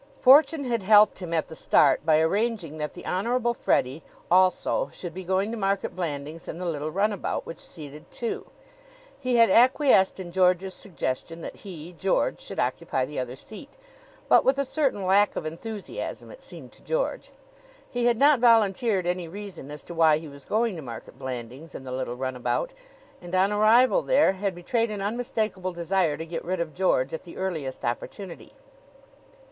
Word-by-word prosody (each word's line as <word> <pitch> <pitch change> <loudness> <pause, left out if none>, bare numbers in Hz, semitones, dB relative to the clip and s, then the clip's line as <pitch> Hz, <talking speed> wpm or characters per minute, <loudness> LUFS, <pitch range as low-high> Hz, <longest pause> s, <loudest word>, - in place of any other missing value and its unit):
Fortune 290 +3 +6
had 235 -4 -1
helped 210 +1 +5
him 180 -3 -6
at 160 -2 0
the 160 - -9
start - - +3
by 155 -1 +4
arranging 185 -2 0
that 150 0 -4
the 175 - -10
Honorable 235 +5 0
Freddie, 135 - 0 0.3
also, 185 - +3
should 175 -3 -7
be 185 - -7
going 190 +4 0
to 235 - -4
Market 195 -1 -1
Blandings 155 -2 -5
in - - -6
the 180 - -5
little 155 -3 -2
runabout, 200 +4 -1
which 165 - -8
seated 150 -1 -9
two. 235 - -4 0.7
He 255 -3 0
had 230 -4 +5
acquiesced 245 -4 +4
in 175 -2 -7
George's 185 +1 +2
suggestion 165 -3 -4
that - - -8
he, 175 -3 -9
George, 190 -1 +1
should - - -7
occupy 130 -1 -1
the 150 +1 -5
other 125 0 -4
seat, 220 - -11 0.5
but - - +6
with 270 +1 +3
a 280 - 0
certain 265 -8 0
lack 200 +2 +3
of - - -4
enthusiasm 200 +6 -6
it - - -13
seemed - - -10
to - - -18
George. - - -2 0.6
He 245 -1 -2
had 240 -1 +3
not 285 +1 +5
volunteered 220 -4 +3
any 175 -1 -2
reason 185 -5 -9
as 150 0 -9
to - - -9
why 160 -2 +4
he 160 0 -8
was 140 -1 -12
going 225 -1 0
to - - -6
Market 120 -5 -9
Blandings 130 +4 -7
in - - -7
the 130 - -7
little 130 -1 -3
runabout, 130 - -2 0.5
and 175 +1 -5
on 190 +2 +3
arrival 230 - +5
there - - +4
had 195 -1 -3
betrayed 225 +6 -1
an 205 -2 -4
unmistakable 215 -4 -2
desire 175 -2 0
to 160 - -5
get 165 0 -5
rid 185 +1 -2
of 165 -3 -3
George 140 -7 +1
at 160 - -4
the 175 - -12
earliest 160 -9 -4
opportunity. 170 +9 -5
185 Hz, 180 wpm, -26 LUFS, 160-220 Hz, 0.7 s, Fortune